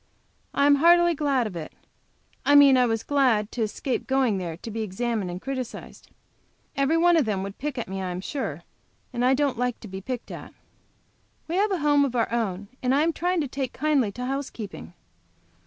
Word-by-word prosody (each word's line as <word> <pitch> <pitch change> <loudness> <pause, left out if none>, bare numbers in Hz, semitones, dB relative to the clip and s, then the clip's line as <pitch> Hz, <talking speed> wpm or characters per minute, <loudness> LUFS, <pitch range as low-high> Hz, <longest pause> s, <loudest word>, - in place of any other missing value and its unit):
I 280 - +3
am 285 0 +6
heartily 345 +3 +5
glad 280 -5 +1
of 205 -5 -6
it. 160 -2 -7 0.7
I 290 - +4
mean 280 -2 +8
I 250 -1 +4
was 225 -1 -1
glad 250 -7 +2
to 240 - -4
escape 225 +4 -2
going 260 -7 +2
there 170 -3 -5
to 225 - -8
be 225 +1 -3
examined 215 -1 -2
and 175 +1 -5
criticised. 260 0 -6 0.7
Every 275 +3 +2
one 345 0 +5
of 305 - +3
them 200 -3 -1
would 195 0 -7
pick 290 0 -4
at 240 - -3
me, 190 +1 -4
I 185 - -3
am 180 0 -4
sure, 190 - -4 0.5
and 240 0 -1
I 260 +1 +4
don't 275 -3 0
like 245 -1 -1
to - - -9
be 190 0 -7
picked 245 +3 -5
at. - - -9 0.9
We 325 - -4
have 415 +2 +3
a 375 -5 -1
home 290 -1 +5
of 260 -3 -1
our 230 -2 +1
own, 205 -4 -2
and 255 +1 +2
I 290 - +3
am 330 +1 +1
trying 355 +1 0
to 290 - -2
take 265 -1 -4
kindly 280 -7 +1
to 250 +3 -5
housekeeping. 255 -9 -5
250 Hz, 210 wpm, -25 LUFS, 210-285 Hz, 0.9 s, mean